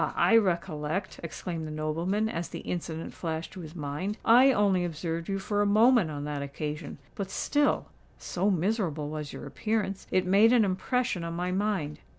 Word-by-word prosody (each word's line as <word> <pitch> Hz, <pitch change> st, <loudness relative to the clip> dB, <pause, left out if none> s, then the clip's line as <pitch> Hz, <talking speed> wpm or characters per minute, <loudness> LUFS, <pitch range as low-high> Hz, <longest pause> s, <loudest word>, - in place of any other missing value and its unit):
I 230 Hz, -, +4 dB
recollect," 175 Hz, -3 st, 0 dB
exclaimed 170 Hz, -1 st, -5 dB
the -, -, -6 dB
nobleman, 165 Hz, +8 st, -1 dB
as 170 Hz, -5 st, -3 dB
the -, -, -6 dB
incident 165 Hz, -2 st, -4 dB
flashed 160 Hz, -1 st, -4 dB
to -, -, -9 dB
his 160 Hz, -1 st, -9 dB
mind. 160 Hz, +7 st, -3 dB
"I 250 Hz, +4 st, +7 dB
only 200 Hz, -6 st, +2 dB
observed 165 Hz, 0 st, -3 dB
you 195 Hz, -, 0 dB
for 205 Hz, +1 st, -1 dB
a 205 Hz, -, +3 dB
moment 220 Hz, -2 st, +5 dB
on 145 Hz, -1 st, -5 dB
that 145 Hz, -1 st, -3 dB
occasion; 150 Hz, +2 st, -5 dB, 0.2 s
but 195 Hz, -2 st, -4 dB
still—so 210 Hz, -8 st, -1 dB
miserable 180 Hz, -5 st, 0 dB
was 150 Hz, -2 st, -5 dB
your -, -, -8 dB
appearance—it 195 Hz, +3 st, -1 dB
made 205 Hz, +6 st, +5 dB
an 235 Hz, -4 st, +5 dB
impression 200 Hz, +1 st, -1 dB
on 170 Hz, 0 st, -4 dB
my 180 Hz, +1 st, -1 dB
mind. 185 Hz, -7 st, -1 dB
180 Hz, 165 wpm, -28 LUFS, 155-205 Hz, 0.2 s, I